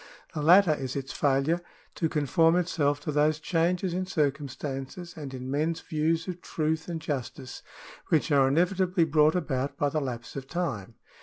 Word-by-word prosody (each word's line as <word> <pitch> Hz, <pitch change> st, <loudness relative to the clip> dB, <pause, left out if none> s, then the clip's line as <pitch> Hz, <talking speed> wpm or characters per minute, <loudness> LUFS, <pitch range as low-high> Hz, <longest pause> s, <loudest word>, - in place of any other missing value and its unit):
The 155 Hz, -, -3 dB
latter 175 Hz, +2 st, +6 dB
is 135 Hz, -4 st, -4 dB
its 135 Hz, -1 st, -4 dB
failure 145 Hz, +5 st, +1 dB, 0.3 s
to 160 Hz, -, -1 dB
conform 160 Hz, +3 st, +3 dB
itself 150 Hz, -5 st, +1 dB
to 150 Hz, -, -3 dB
those 150 Hz, +1 st, +2 dB
changes 175 Hz, +2 st, 0 dB
in 185 Hz, +1 st, -2 dB
circumstances 145 Hz, +1 st, -3 dB
and 145 Hz, -4 st, -7 dB
in 130 Hz, 0 st, -6 dB
men's 160 Hz, +3 st, 0 dB
views 160 Hz, +1 st, -1 dB
of 180 Hz, -1 st, -5 dB
truth 160 Hz, 0 st, -2 dB
and 170 Hz, -2 st, -3 dB
justice, 135 Hz, -4 st, -5 dB, 0.5 s
which 160 Hz, 0 st, +1 dB
are 140 Hz, -2 st, +5 dB
inevitably 180 Hz, +4 st, +2 dB
brought 155 Hz, +1 st, +4 dB
about 140 Hz, -6 st, -2 dB
by 145 Hz, -3 st, +1 dB
the 155 Hz, +2 st, -1 dB
lapse 120 Hz, -3 st, -5 dB
of 135 Hz, -1 st, -6 dB
time. 120 Hz, -, -3 dB
155 Hz, 165 wpm, -28 LUFS, 140-170 Hz, 0.5 s, latter